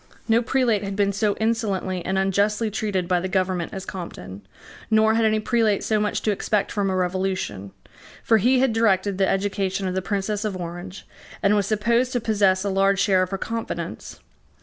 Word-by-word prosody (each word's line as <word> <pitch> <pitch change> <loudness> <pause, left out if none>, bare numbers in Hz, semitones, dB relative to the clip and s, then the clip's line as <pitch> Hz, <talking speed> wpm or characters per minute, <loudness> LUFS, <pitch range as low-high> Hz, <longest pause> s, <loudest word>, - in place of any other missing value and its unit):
No 230 0 +4
prelate 245 -4 +1
had 195 0 -4
been 200 0 +1
so 205 0 0
insolently 205 -5 -1
and 190 +2 -1
unjustly 205 +3 +1
treated 200 -4 -2
by 180 -1 +2
the 185 - -3
government 185 -2 -1
as 190 -1 -6
Compton; 100 - -8 0.5
nor 220 0 +4
had 225 0 +2
any 215 0 +2
prelate 220 -2 +1
so 215 -1 +1
much 210 0 -1
to 215 - +2
expect 205 0 -1
from 200 -2 0
a 190 - -1
revolution: 185 - -2 0.5
for 225 -1 +4
he 250 +6 +3
had 265 -4 +2
directed 200 -3 +1
the 190 - +3
education 195 -1 -1
of 185 - -2
the 190 - -1
Princess 205 +2 -2
of 205 -3 -3
Orange, 175 +2 -7 0.4
and 200 +1 +4
was 200 -2 +1
supposed 235 +4 +1
to 245 - +1
possess 200 -4 +2
a 200 - -1
large 195 0 +2
share 195 -2 +3
of 185 - -1
her 195 - -3
confidence. 230 +3 -5
200 Hz, 195 wpm, -23 LUFS, 190-220 Hz, 0.5 s, No